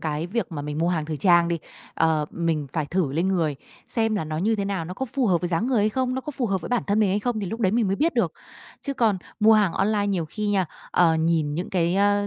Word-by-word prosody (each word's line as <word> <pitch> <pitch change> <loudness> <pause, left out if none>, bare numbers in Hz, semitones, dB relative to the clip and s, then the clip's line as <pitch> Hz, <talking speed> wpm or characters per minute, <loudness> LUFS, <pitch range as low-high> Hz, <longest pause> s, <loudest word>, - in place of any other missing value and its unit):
cái 155 +1 -2
việc 215 -2 -3
mà 145 -2 -4
mình 150 +1 -4
mua 170 +2 +1
hàng 160 -4 0
thời 155 -1 -4
trang 175 0 +4
đi, 170 - -1 0.4
ờ, 155 -2 +2
mình 165 -4 -1
phải 155 -3 -1
thử 160 -3 -1
lên 170 +5 0
người 160 -7 0 0.3
xem 225 -2 0
là 195 - -1
nó 155 0 -4
như 220 +5 +1
thế 200 - -1
nào? 195 -4 -2
Nó 180 - -6
có 265 +7 -3
phù 255 0 -1
hợp 175 -4 +2
với 175 - -2
dáng 180 +7 0
người 255 -4 +2
hay 210 - +3
không? 255 +3 -1
Nó 260 - -2
có 300 - -6
phù 255 -3 -1
hợp 195 -2 -1
với - - -7
bản 245 -2 +1
thân 205 +2 +2
mình 210 - +3
hay 205 +2 +1
không? 230 -1 -1
Thì 195 - -3
lúc 225 +6 -5
đấy 190 -4 +2
mình 225 -2 +2
mới 195 +1 0
biết 330 +3 +1
được. - - +1 0.5
Chứ 280 - -4
còn 220 -7 +2 0.2
mua 220 +1 +6
hàng 205 -5 +3
online 205 0 +1
nhiều 185 -5 0
khi 210 +7 -4
nha, 195 -3 +2 0.3
ờ, 165 -2 +4
nhìn 160 -2 +1
những 175 +4 -4
cái, 175 -1 +1
ơ, 205 +1 +2
190 Hz, 295 wpm, -24 LUFS, 165-215 Hz, 0.5 s, mua